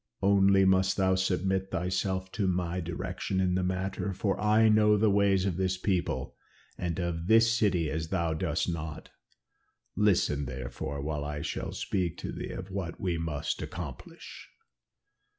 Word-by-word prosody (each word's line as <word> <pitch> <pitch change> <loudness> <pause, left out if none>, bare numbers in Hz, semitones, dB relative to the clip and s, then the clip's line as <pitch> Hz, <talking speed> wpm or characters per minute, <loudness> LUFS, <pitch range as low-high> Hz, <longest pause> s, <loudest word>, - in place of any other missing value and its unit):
Only 95 -1 +5
must 95 0 +3
thou 95 -1 +3
submit 95 +1 0
thyself 95 +1 -2
to 100 -2 -1
my 90 -1 -1
direction 90 +2 -3
in 90 -1 +2
the 95 - +1
matter, 95 +2 -2
for 95 +1 -1
I 110 +1 +4
know 105 -1 +5
the 105 0 +3
ways 100 -2 +3
of 90 -3 -1
this 95 0 0
people 90 -9 -1 0.4
and 85 -2 -3
of 85 -2 -2
this 115 +1 +6
city 100 -8 +2
as 80 0 -2
thou 85 -2 0
dost 80 - -1
not. 80 -3 -5 0.8
Listen 90 -8 +2
therefore 65 +2 -5
while 75 -1 -2
I 75 0 -4
shall - - -3
speak 90 -4 -2
to - - -5
thee - - -6
of 95 +1 -7
what 95 -3 -4
we 90 -3 -1
must 75 -3 -3
accomplish." 75 -8 -8
95 Hz, 155 wpm, -29 LUFS, 85-95 Hz, 0.8 s, this